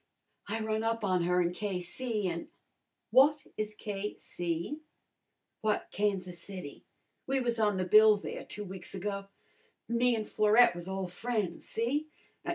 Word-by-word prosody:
I 220 Hz, +2 st, -1 dB
run 220 Hz, 0 st, -1 dB
up 225 Hz, -1 st, 0 dB
on 185 Hz, -3 st, +2 dB
her 180 Hz, +1 st, +3 dB
in 175 Hz, 0 st, -1 dB
K.C., 205 Hz, +3 st, -2 dB
an' 170 Hz, -1 st, -3 dB, 0.3 s
" -, -, -53 dB
"What 290 Hz, +2 st, +6 dB
is 215 Hz, 0 st, -3 dB
K.C.?" 195 Hz, -, -4 dB, 0.8 s
"Why, 215 Hz, -1 st, +2 dB
Kansas 185 Hz, -4 st, -1 dB
City! 180 Hz, -7 st, -7 dB, 0.4 s
We 270 Hz, 0 st, +2 dB
was 240 Hz, -2 st, 0 dB
on 210 Hz, -3 st, +3 dB
the 185 Hz, -, 0 dB
bill 215 Hz, +3 st, +7 dB
there 200 Hz, -, -6 dB
two 210 Hz, -, -5 dB
weeks 190 Hz, 0 st, -7 dB
ago. 200 Hz, +1 st, -3 dB, 0.6 s
Me 235 Hz, +1 st, +3 dB
an' 215 Hz, -1 st, -2 dB
Florette 215 Hz, 0 st, +5 dB
was 175 Hz, 0 st, -6 dB
ole 190 Hz, -1 st, -2 dB
friends, 200 Hz, -1 st, -3 dB
see? 260 Hz, +7 st, 0 dB
210 Hz, 150 wpm, -31 LUFS, 185-225 Hz, 0.8 s, bill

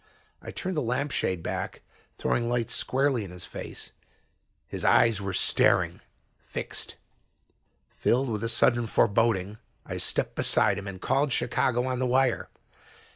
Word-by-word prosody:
I -, -, -8 dB
turned 185 Hz, -1 st, -4 dB
the 150 Hz, -, +1 dB
lamp 130 Hz, +4 st, -1 dB
shade 90 Hz, -8 st, -1 dB
back, -, -, -4 dB, 0.3 s
throwing 120 Hz, -1 st, -1 dB
light 120 Hz, -2 st, -1 dB
squarely 135 Hz, -3 st, +1 dB
in 95 Hz, -, -8 dB
his 90 Hz, 0 st, -8 dB
face. -, -, -7 dB, 0.8 s
His -, -, -6 dB
eyes 115 Hz, -3 st, +4 dB
were 100 Hz, 0 st, -3 dB
staring, 90 Hz, -, +2 dB, 0.4 s
fixed. -, -, -5 dB, 0.9 s
Filled 130 Hz, +3 st, +1 dB
with 110 Hz, -1 st, -2 dB
a 115 Hz, -, 0 dB
sudden 120 Hz, 0 st, +3 dB
foreboding, 110 Hz, -2 st, +2 dB, 0.3 s
I -, -, -5 dB
stepped -, -, -1 dB
beside 100 Hz, -3 st, +2 dB
him 100 Hz, -, -8 dB
and 95 Hz, -1 st, -6 dB
called 135 Hz, +5 st, +1 dB
Chicago 125 Hz, 0 st, +1 dB
on 130 Hz, -1 st, -1 dB
the 130 Hz, -, +1 dB
wire. 130 Hz, 0 st, +2 dB
120 Hz, 145 wpm, -27 LUFS, 105-130 Hz, 0.9 s, eyes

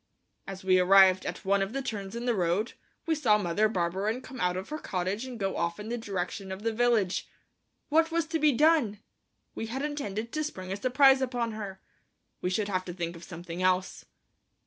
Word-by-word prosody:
As 195 Hz, -1 st, -7 dB
we 185 Hz, -1 st, +4 dB
arrived 190 Hz, 0 st, +6 dB
at -, -, -6 dB
one 200 Hz, +1 st, +3 dB
of 195 Hz, +3 st, -2 dB
the 275 Hz, -, -1 dB
turns 205 Hz, -5 st, -5 dB
in 235 Hz, +1 st, -4 dB
the 245 Hz, -, +2 dB
road, 190 Hz, +3 st, 0 dB, 0.3 s
we 330 Hz, -, +1 dB
saw 235 Hz, -9 st, +3 dB
Mother 205 Hz, +2 st, +1 dB
Barberin 195 Hz, +5 st, -1 dB
come 260 Hz, -1 st, -9 dB
out 180 Hz, 0 st, +1 dB
of 190 Hz, -, -6 dB
her 305 Hz, +1 st, -4 dB
cottage 190 Hz, +4 st, -2 dB
and 255 Hz, -2 st, -7 dB
go 195 Hz, -1 st, -1 dB
off 170 Hz, +1 st, -2 dB
in 210 Hz, +2 st, -6 dB
the 240 Hz, -, -2 dB
direction 195 Hz, -1 st, -4 dB
of 190 Hz, +2 st, -6 dB
the 225 Hz, 0 st, 0 dB
village. 225 Hz, -5 st, +1 dB, 0.6 s
What 325 Hz, +2 st, +4 dB
was 335 Hz, -1 st, 0 dB
to 325 Hz, 0 st, 0 dB
be 305 Hz, 0 st, +5 dB
done? 290 Hz, -6 st, +3 dB, 0.6 s
We 225 Hz, -, -4 dB
had 265 Hz, +5 st, -4 dB
intended 230 Hz, -7 st, -4 dB
to 310 Hz, -, -1 dB
spring 185 Hz, -11 st, -6 dB
a -, -, -1 dB
surprise 265 Hz, +3 st, +5 dB
upon 245 Hz, -3 st, -1 dB
her. 200 Hz, -3 st, -6 dB, 0.6 s
We 180 Hz, -, 0 dB
should 200 Hz, +2 st, 0 dB
have 185 Hz, -2 st, -1 dB
to 175 Hz, -, -6 dB
think 170 Hz, -1 st, -3 dB
of 170 Hz, -, -11 dB
something 170 Hz, 0 st, -7 dB
else. 185 Hz, 0 st, 0 dB
205 Hz, 210 wpm, -29 LUFS, 185-250 Hz, 0.6 s, arrived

